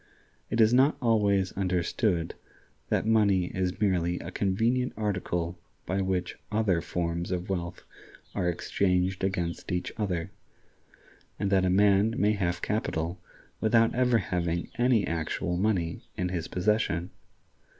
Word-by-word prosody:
It 115 - -1
is 110 +1 +5
not 135 +4 +4
always 100 -5 +2
understood 90 -1 0 0.6
that - - +1
money 100 -5 +3
is 90 -1 -1
merely 90 -4 +1
a - - -7
convenient 115 +6 0
article 90 -5 -2 0.3
by 95 +2 -1
which 95 -1 -2
other 105 -6 +2
forms 85 0 -2
of 90 +1 -3
wealth 85 -2 -4 0.5
are 90 -3 0
exchanged 90 +1 0
against 90 -2 -2
each 90 0 -2
other, 95 -3 -2 1.1
and 100 -1 -1
that 95 -1 +3
a - - +2
man 100 +3 +4
may 105 +1 +3
have 85 -4 -1
capital 90 -4 -2 0.4
without 115 +1 +3
ever 125 -1 +3
having 85 -3 -2
any 120 -5 +3
actual 85 +1 -2
money 90 -4 0 0.2
in 90 0 -1
his 85 -3 -3
possession. 90 -3 0
95 Hz, 130 wpm, -28 LUFS, 90-105 Hz, 1.1 s, is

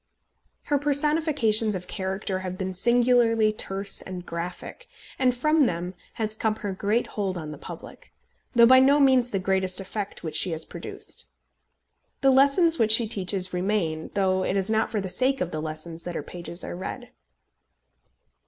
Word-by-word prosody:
Her 290 -1 0
personifications 285 -7 +2
of 180 -1 -6
character 190 0 -3
have 185 -1 -6
been 190 0 -3
singularly 235 +1 +3
terse 195 -1 0
and 180 -1 -8
graphic, 175 - -7 0.3
and 255 -1 +4
from 305 +1 +3
them 175 +1 -3 0.2
has 215 -1 -3
come 220 -1 0
her 205 -3 -5
great 210 +5 0
hold 195 -3 -3
on 155 -3 -6
the 150 - -9
public, - - -11 0.4
though 235 0 +7
by 260 +2 +7
no 275 +3 +5
means 260 -3 +4
the 205 - -2
greatest 190 0 0
effect 200 +1 -6
which 155 -2 -5
she 175 +2 +3
has 160 0 -2
produced. - - -8 0.9
The 270 - +5
lessons 280 +6 +4
which 220 -1 +3
she 225 0 +5
teaches 190 -3 -1
remain, 180 -4 -1
though 190 -1 +1
it 195 - -1
is 195 +2 0
not 220 0 +1
for 215 - -2
the 190 - -4
sake 255 +9 +1
of 180 - -2
the 155 - -4
lessons 160 +2 -6
that 175 -1 -5
her - - -3
pages 170 +2 -7
are - - -6
read. 185 - -7
200 Hz, 170 wpm, -25 LUFS, 185-245 Hz, 0.9 s, though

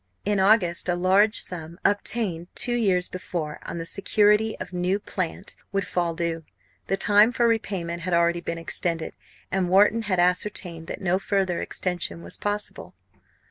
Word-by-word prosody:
In 205 -1 +1
August 190 -3 +3
a 175 - +2
large 195 +5 +3
sum, 170 -1 0
obtained 200 -4 0
two 245 - +1
years 190 -7 +2
before 175 -5 -5
on - - -5
the 165 - -4
security 210 +4 +2
of - - -7
new 180 +2 0
"plant," 190 -2 -5 0.2
would 195 -1 -1
fall 170 -2 -1
due. 165 -1 -2 0.4
The 195 - 0
time 210 +4 +5
for 240 -1 +2
repayment 185 -7 -1
had 180 +1 -2
already 170 0 +2
been 170 -1 -4
extended; 165 0 -3 0.4
and 185 -2 0
Wharton 205 +5 +4
had 195 -5 0
ascertained 180 -2 0
that - - -6
no 185 0 +1
further 195 -3 0
extension 175 -2 -3
was - - -8
possible. 205 0 -4
185 Hz, 160 wpm, -25 LUFS, 170-205 Hz, 0.4 s, time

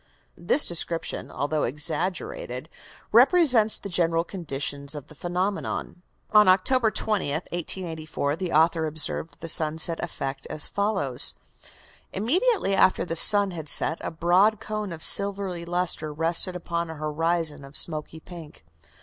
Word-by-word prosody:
This 180 - +2
description, 170 -1 -3
although 145 +2 -2
exaggerated, 150 -1 -4 0.4
represents 250 -3 +4
the - - -8
general 165 -2 +1
conditions 145 -5 -5
of 145 -1 -9
the - - -13
phenomenon. 180 +3 -4 0.3
On 210 -2 +6
October 220 +6 +3
20th, 210 -8 -1 0.2
1884, 160 -4 -3
the 180 0 -5
author 160 +1 +2
observed 155 +1 -1
the 165 - -6
sunset 160 +1 +3
effect 135 0 -5
as 150 - +3
follows: 195 - 0 0.8
"Immediately 310 - +1
after 190 -1 +3
the 165 - -4
sun 205 +3 +7
had 160 -4 -5
set, 160 - +3
a - - -4
broad 180 +6 +2
cone 215 -2 -5
of 160 -1 -5
silvery 195 -3 +2
lustre 175 -3 -2
rested 165 +4 0
upon 170 -1 -4
a 160 - -7
horizon 155 0 -1
of 140 +1 -2
smoky 155 0 -2
pink. 160 - -13
170 Hz, 130 wpm, -25 LUFS, 155-195 Hz, 0.8 s, sun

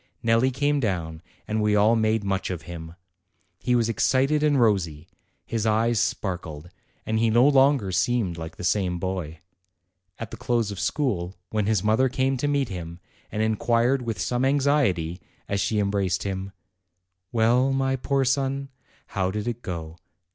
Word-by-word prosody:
Nelli 115 +3 +3
came 145 +3 +1
down, 85 -9 -2 0.3
and 110 0 -1
we 105 0 +2
all 105 +3 +4
made 110 -1 +1
much 95 -1 -1
of 85 -3 -4
him. 85 -1 -8 0.6
He 125 - +1
was 115 -2 +2
excited 135 +6 +2
and 150 -2 +3
rosy, 90 -9 +1 0.4
his 110 -1 -2
eyes 110 +1 +2
sparkled, 85 -5 -3 0.3
and 110 0 0
he 115 0 +3
no 120 +4 +5
longer 135 -7 +4
seemed 105 -3 +1
like 80 0 -7
the - - -7
same 90 -1 +1
boy. 90 -3 -4 0.8
At 115 - -7
the - - -7
close 120 -5 0
of 100 - -6
school, 100 - -1 0.2
when 105 -2 0
his 105 -4 +1
mother 110 +5 +3
came 135 +1 0
to 145 - -1
meet 140 -4 0
him, 85 -3 -7 0.3
and 110 0 -1
inquired 115 +4 +2
with 115 -3 -4
some 125 +1 -1
anxiety, 130 - +1 0.3
as 100 0 -1
she 105 +2 0
embraced 100 -3 0
him, 95 0 -4 0.8
"Well, 120 +4 +3
my 135 0 +1
poor 135 +1 0
son, 135 +1 0 0.4
how 95 -1 -1
did 105 +3 -4
it 120 0 -3
go? 85 -3 -6
110 Hz, 165 wpm, -25 LUFS, 95-130 Hz, 0.8 s, no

